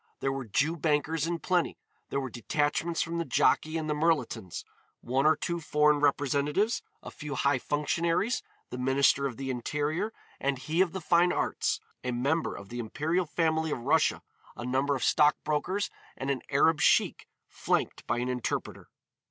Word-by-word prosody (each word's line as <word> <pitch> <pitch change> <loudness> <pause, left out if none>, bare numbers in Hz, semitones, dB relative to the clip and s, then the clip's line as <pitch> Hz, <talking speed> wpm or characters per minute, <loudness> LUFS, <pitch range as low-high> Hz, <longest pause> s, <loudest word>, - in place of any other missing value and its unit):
There 135 - 0
were 135 -1 -4
Jew 150 +10 +1
bankers 155 +1 0
in 170 0 -1
plenty, 180 0 0 0.3
there 140 - -1
were 130 -3 -4
detachments 150 +7 0
from 170 +1 -3
the - - +1
Jockey 160 -1 +2
and 155 -1 -3
the 150 - +1
Mirletons, 150 - -1 0.4
one 135 +4 +1
or 155 - +5
two 170 +3 -3
foreign 150 -1 +3
representatives, 145 - +1 0.2
a - - -8
few 150 -2 -6
high 140 -1 +2
functionaries, 165 - 0 0.3
the 125 - -5
Minister 135 +2 +3
of 125 - -7
the 135 -1 -3
Interior, 150 - -2 0.3
and 140 0 0
he 155 +7 0
of 190 -3 +2
the 190 - -4
Fine 175 +2 +4
Arts, - - 0 0.2
a 125 - -2
member 140 +7 0
of 100 - -10
the 120 - -6
imperial 155 +9 -1
family 160 0 +1
of 130 - -3
Russia, 150 +4 +2 0.3
a 120 - -6
number 135 +3 +1
of 130 - -3
stock 150 -1 +4
brokers 180 +7 -1 0.3
and 135 +1 -2
an 135 - -2
Arab 150 +2 +3
Sheik - - +3 0.2
flanked - - -1
by 120 - 0
an 120 +1 -1
interpreter. 125 -2 -3
150 Hz, 175 wpm, -29 LUFS, 135-165 Hz, 0.4 s, or